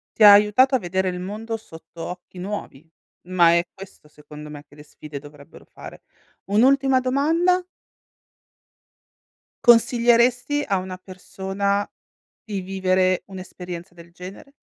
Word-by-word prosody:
Ti 220 Hz, -, +2 dB
ha 205 Hz, -, +11 dB
aiutato 210 Hz, +6 st, +5 dB
a -, -, +1 dB
vedere 190 Hz, 0 st, -2 dB
il 180 Hz, 0 st, -5 dB
mondo 215 Hz, +5 st, -5 dB
sotto 165 Hz, -4 st, -13 dB
occhi 180 Hz, 0 st, -9 dB
nuovi. 180 Hz, -6 st, -7 dB, 0.4 s
Ma 175 Hz, -2 st, +4 dB
è 170 Hz, +1 st, +1 dB
questo 190 Hz, -5 st, -14 dB
secondo 150 Hz, 0 st, -13 dB
me 145 Hz, -1 st, -10 dB
che -, -, -20 dB
le 150 Hz, -, -14 dB
sfide 150 Hz, -1 st, -10 dB
dovrebbero 145 Hz, 0 st, -16 dB
fare. -, -, -13 dB, 0.4 s
Un'ultima 265 Hz, +5 st, +3 dB
domanda 325 Hz, +8 st, +1 dB, 2.0 s
consiglieresti 240 Hz, +3 st, +3 dB
a 195 Hz, -, +1 dB
una 185 Hz, 0 st, -6 dB
persona 195 Hz, +2 st, -3 dB, 0.5 s
di 205 Hz, -4 st, -5 dB
vivere 185 Hz, -1 st, 0 dB
un'esperienza 180 Hz, -2 st, -9 dB
del 170 Hz, 0 st, -16 dB
genere? 185 Hz, +10 st, -12 dB
190 Hz, 125 wpm, -22 LUFS, 175-230 Hz, 2.0 s, ha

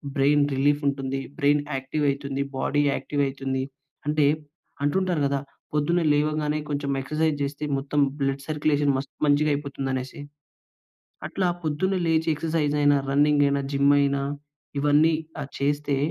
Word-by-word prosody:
Brain 145 Hz, +1 st, +4 dB
రిలీఫుంటుంది. 140 Hz, -1 st, 0 dB, 0.2 s
Brain 145 Hz, +1 st, +3 dB
యాక్టివైతుంది. 140 Hz, 0 st, -1 dB, 0.2 s
Body 145 Hz, +2 st, +1 dB
యాక్టివైతుంది. 135 Hz, -1 st, -2 dB, 0.5 s
అంటే 150 Hz, -1 st, +3 dB, 0.6 s
అంటుంటారు 175 Hz, +2 st, +1 dB
కదా! 140 Hz, 0 st, 0 dB, 0.3 s
పొద్దున్న 150 Hz, +4 st, +2 dB
లేవగానే 150 Hz, 0 st, 0 dB
కొంచెం 145 Hz, -1 st, -2 dB
ఎక్సర్‌సై‌జ్ 155 Hz, +2 st, 0 dB
చేస్తే 140 Hz, +1 st, -4 dB
మొత్తం 140 Hz, +2 st, -2 dB, 0.2 s
బ్లడ్ 135 Hz, 0 st, -1 dB
సర్క్యులేషన్ 150 Hz, -2 st, +1 dB
మస్తు 135 Hz, +1 st, -6 dB
మంచిగా 150 Hz, +1 st, +3 dB
అయిపోతుందనేసి. 135 Hz, -1 st, -4 dB, 1.1 s
అట్లా 190 Hz, -, -1 dB, 0.2 s
పొద్దున్న 160 Hz, +6 st, 0 dB
లేచి 160 Hz, 0 st, +2 dB
ఎక్సర్సైజైనా, 150 Hz, -2 st, +2 dB
రన్నింగైనా, 145 Hz, 0 st, +3 dB
జిమ్‌‌ 140 Hz, 0 st, +4 dB
అయినా 140 Hz, 0 st, +1 dB, 0.6 s
ఇవన్నీఆ! 155 Hz, +1 st, +2 dB
చేస్తే 145 Hz, 0 st, 0 dB
145 Hz, 110 wpm, -25 LUFS, 140-150 Hz, 1.1 s, Brain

